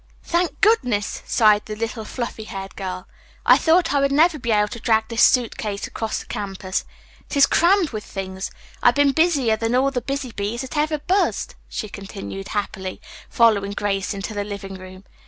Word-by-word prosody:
"Thank 345 Hz, 0 st, -1 dB
goodness," 250 Hz, -, +2 dB
sighed 210 Hz, -3 st, +4 dB
the 215 Hz, -, -5 dB
little 225 Hz, 0 st, -4 dB
fluffy 235 Hz, -3 st, -5 dB
haired 195 Hz, -2 st, -7 dB
girl. 185 Hz, -1 st, -5 dB, 0.4 s
"I -, -, +8 dB
thought 330 Hz, -2 st, +3 dB
I 285 Hz, -, +3 dB
would 275 Hz, 0 st, +2 dB
never 310 Hz, +2 st, +4 dB
be 235 Hz, -2 st, -2 dB
able 210 Hz, -1 st, +3 dB
to 235 Hz, -, -7 dB
drag 220 Hz, -1 st, +1 dB
this 230 Hz, 0 st, 0 dB
suit 245 Hz, -3 st, +4 dB
case 205 Hz, -1 st, -3 dB
across 225 Hz, -1 st, -3 dB
the -, -, -7 dB
campus. 195 Hz, -3 st, -4 dB, 0.4 s
It -, -, -3 dB
is 280 Hz, -, +8 dB
crammed 355 Hz, 0 st, +3 dB
with 215 Hz, -2 st, -5 dB
things. 190 Hz, -1 st, -5 dB, 0.3 s
I've 245 Hz, -, +5 dB
been 285 Hz, -1 st, +4 dB
busier 280 Hz, -8 st, +2 dB
than 225 Hz, +2 st, 0 dB
all 270 Hz, +2 st, +3 dB
the 250 Hz, -2 st, -2 dB
busy 275 Hz, -2 st, -4 dB
bees 210 Hz, +4 st, -3 dB
that 265 Hz, +3 st, -7 dB
ever 305 Hz, +1 st, +1 dB
buzzed," 370 Hz, +7 st, 0 dB, 0.2 s
she 215 Hz, -, -4 dB
continued 195 Hz, -1 st, -7 dB
happily, 190 Hz, -2 st, -4 dB, 0.3 s
following 205 Hz, -4 st, +3 dB
Grace 200 Hz, -2 st, -1 dB
into 195 Hz, +2 st, -5 dB
the 205 Hz, -1 st, -2 dB
living 200 Hz, -1 st, -7 dB
room. 185 Hz, 0 st, -11 dB
225 Hz, 190 wpm, -22 LUFS, 200-275 Hz, 0.4 s, I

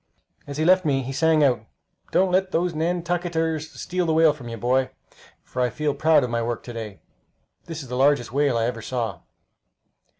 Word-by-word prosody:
As 140 Hz, 0 st, -6 dB
he 155 Hz, -, +1 dB
left 185 Hz, +1 st, +5 dB
me 135 Hz, -3 st, +1 dB
he 130 Hz, -, -5 dB
sang 160 Hz, +2 st, +3 dB
out, 125 Hz, -5 st, +2 dB, 0.5 s
"Don't 190 Hz, 0 st, +3 dB
let 190 Hz, +1 st, +2 dB
those 175 Hz, 0 st, 0 dB
Nantucketers 165 Hz, -1 st, -1 dB
steal 180 Hz, -1 st, -2 dB
the 160 Hz, -, +2 dB
whale 160 Hz, -1 st, +5 dB
from 135 Hz, -5 st, -11 dB
you, 115 Hz, -, -6 dB
boy, 130 Hz, +4 st, +1 dB, 0.5 s
for 125 Hz, -, -4 dB
I 125 Hz, -, +2 dB
feel 150 Hz, +5 st, -1 dB
proud 155 Hz, 0 st, +4 dB
of 125 Hz, -, -3 dB
my 115 Hz, 0 st, 0 dB
work 115 Hz, 0 st, -3 dB
to 120 Hz, -, -8 dB
day! 110 Hz, -4 st, -7 dB, 0.6 s
That 165 Hz, -, -7 dB
is 140 Hz, -, -8 dB
the 125 Hz, -, -5 dB
largest 135 Hz, -3 st, +2 dB
whale 140 Hz, -2 st, +2 dB
I 115 Hz, -, +1 dB
ever 115 Hz, -1 st, -3 dB
saw." 110 Hz, -6 st, -3 dB
145 Hz, 200 wpm, -24 LUFS, 125-165 Hz, 0.6 s, left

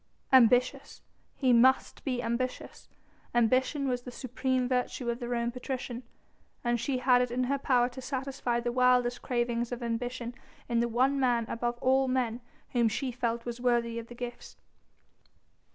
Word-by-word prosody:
Ambitious? 255 Hz, +2 st, +4 dB, 0.3 s
He 255 Hz, -3 st, +3 dB
must 260 Hz, +3 st, +3 dB
be 250 Hz, -3 st, -2 dB
ambitious! 235 Hz, +2 st, -4 dB, 0.5 s
Ambition 255 Hz, +4 st, +2 dB
was 250 Hz, -1 st, -1 dB
the 250 Hz, -, -9 dB
supreme 255 Hz, +1 st, -1 dB
virtue 250 Hz, -1 st, -1 dB
of 235 Hz, -, -5 dB
the 240 Hz, -2 st, -5 dB
Roman 235 Hz, -1 st, -1 dB
patrician! 250 Hz, -1 st, -5 dB, 0.6 s
And 240 Hz, -1 st, +1 dB
she 270 Hz, +2 st, -1 dB
had 250 Hz, -1 st, +4 dB
it 250 Hz, -, 0 dB
in 250 Hz, +2 st, -1 dB
her 275 Hz, +2 st, 0 dB
power 250 Hz, -3 st, +3 dB
to 255 Hz, +1 st, -9 dB
satisfy 260 Hz, -2 st, -2 dB
the 240 Hz, 0 st, -1 dB
wildest 250 Hz, -1 st, +3 dB
cravings 240 Hz, -1 st, -1 dB
of 245 Hz, 0 st, -4 dB
ambition 240 Hz, +1 st, -3 dB, 0.3 s
in 235 Hz, -1 st, +1 dB
the 235 Hz, -, +2 dB
one 260 Hz, +4 st, +2 dB
man 240 Hz, -3 st, +2 dB
above 240 Hz, +1 st, -2 dB
all 265 Hz, +1 st, +3 dB
men 250 Hz, -2 st, -1 dB, 0.3 s
whom 235 Hz, -2 st, +3 dB
she 255 Hz, +4 st, -2 dB
felt 235 Hz, -1 st, -2 dB
was 240 Hz, 0 st, -5 dB
worthy 235 Hz, -2 st, +1 dB
of 230 Hz, -, -9 dB
the 240 Hz, -, -11 dB
gifts. 240 Hz, 0 st, -8 dB
245 Hz, 165 wpm, -29 LUFS, 235-255 Hz, 0.6 s, Ambitious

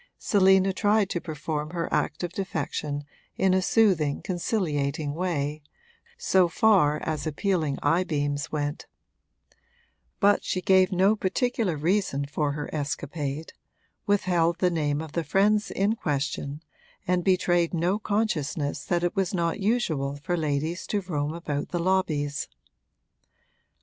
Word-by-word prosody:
Selina 190 Hz, -1 st, +4 dB
tried 205 Hz, 0 st, +2 dB
to 175 Hz, -, -2 dB
perform 155 Hz, -1 st, -4 dB
her 170 Hz, 0 st, -3 dB
act -, -, 0 dB
of 175 Hz, -1 st, -3 dB
defection 150 Hz, -5 st, -3 dB, 0.3 s
in 190 Hz, -1 st, +3 dB
a 190 Hz, -, +3 dB
soothing, 180 Hz, -9 st, +2 dB
conciliating 155 Hz, -6 st, -1 dB
way, 155 Hz, -3 st, -2 dB, 0.6 s
so 190 Hz, -, +3 dB
far 170 Hz, -6 st, +3 dB
as 155 Hz, 0 st, -2 dB
appealing 155 Hz, -3 st, 0 dB
eyebeams 145 Hz, -3 st, 0 dB
went; 145 Hz, 0 st, -3 dB, 1.3 s
but 205 Hz, 0 st, +4 dB
she 185 Hz, -, -1 dB
gave 185 Hz, +1 st, +4 dB
no 190 Hz, +3 st, +4 dB
particular 215 Hz, -, 0 dB
reason 160 Hz, -3 st, 0 dB
for 145 Hz, 0 st, -1 dB
her 150 Hz, 0 st, -4 dB
escapade, 145 Hz, 0 st, -4 dB, 0.5 s
withheld 175 Hz, -4 st, +2 dB
the 180 Hz, 0 st, +2 dB
name 150 Hz, -3 st, 0 dB
of 160 Hz, -, -9 dB
the 170 Hz, +1 st, -1 dB
friends 205 Hz, +6 st, +2 dB
in 200 Hz, +3 st, +1 dB
question 145 Hz, -2 st, -3 dB, 0.4 s
and 180 Hz, 0 st, +1 dB
betrayed 175 Hz, -2 st, +2 dB
no 175 Hz, +4 st, 0 dB
consciousness 170 Hz, -10 st, -1 dB
that 175 Hz, -1 st, 0 dB
it 175 Hz, -, 0 dB
was 195 Hz, -1 st, 0 dB
not 170 Hz, +2 st, 0 dB
usual 170 Hz, -, 0 dB
for 175 Hz, -, 0 dB
ladies 155 Hz, +2 st, -2 dB
to 205 Hz, -, 0 dB
roam 150 Hz, -5 st, -2 dB
about 145 Hz, -4 st, -3 dB
the 175 Hz, -, -2 dB
lobbies. 165 Hz, -6 st, 0 dB
170 Hz, 130 wpm, -26 LUFS, 150-190 Hz, 1.3 s, Selina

